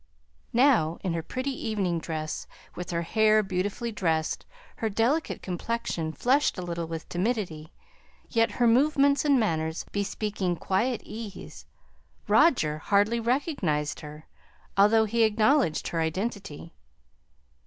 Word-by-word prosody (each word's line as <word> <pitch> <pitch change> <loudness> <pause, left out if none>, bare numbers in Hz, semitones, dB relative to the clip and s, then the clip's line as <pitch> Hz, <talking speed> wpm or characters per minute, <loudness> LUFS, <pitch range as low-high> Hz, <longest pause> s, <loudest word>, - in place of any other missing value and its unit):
Now 230 - +3
in 185 -3 -1
her 165 - -1
pretty 255 - -3
evening 200 -9 -1
dress, 155 -1 -4 0.3
with 180 - -7
her 170 -1 -1
hair 215 +3 +3
beautifully 195 +5 -2
dressed, 165 -6 -1 0.3
her 225 - -1
delicate 235 +10 0
complexion 180 -3 -3
flushed 260 - +1
a 185 - -4
little 170 -1 -4
with 160 0 -6
timidity, 175 -6 -2 0.6
yet 230 -1 +1
her 245 - +1
movements 280 +4 +4
and 280 -3 +4
manners 160 -6 -1
bespeaking 200 -2 -2
quiet 220 +8 -1
ease, 215 -2 -9 0.6
Roger 155 - +3
hardly 205 +6 +2
recognized 225 - -1
her, 150 +1 -10 0.5
although 215 +3 +5
he 230 +2 0
acknowledged 220 - +2
her 165 - -1
identity. 170 -1 -4
205 Hz, 120 wpm, -27 LUFS, 165-235 Hz, 0.6 s, although